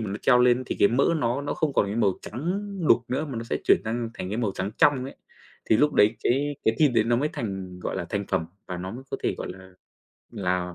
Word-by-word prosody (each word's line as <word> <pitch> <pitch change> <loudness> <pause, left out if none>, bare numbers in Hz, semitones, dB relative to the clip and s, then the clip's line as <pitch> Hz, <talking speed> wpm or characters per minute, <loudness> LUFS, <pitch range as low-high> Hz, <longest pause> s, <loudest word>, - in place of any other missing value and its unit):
mà 105 -3 -3
nó 100 - -3
treo 125 - +5
lên 125 +1 +4
thì - - -3
cái 100 - +6
mỡ 125 +4 +2
nó 120 -1 0
nó 145 - -2
không 155 -3 0
còn 100 - +2
cái 100 +3 -3
màu 100 -5 +1
trắng 175 - -3 0.3
đục - - +5
nữa 130 +5 -1
mà 135 -5 -6
nó 115 - -5
sẽ - - -2
chuyển - - +5
sang 115 +1 -2
thành 90 - -5
cái 105 - -2
màu 110 -5 0
trắng 95 +2 -3
trong 140 -3 +4
ấy. 135 - -8 0.5
Thì 110 - +3
lúc 150 +5 +3
đấy 110 +3 +4
cái 145 +3 +1
cái 110 - +3
thịt 150 -3 +5
đấy 110 -2 +4
nó 120 +1 +2
mới 145 +5 +1
thành, 95 -4 -5
gọi - - -3
là, 85 - -3
thành 100 -1 -2
phẩm 80 - 0 0.2
và 90 - -5
nó 90 +1 -5
mới 125 +5 -8
có - - -2
thể, - - 0
gọi - - -5 0.6
là-là, 90 -4 -3
115 Hz, 270 wpm, -25 LUFS, 100-130 Hz, 0.6 s, cái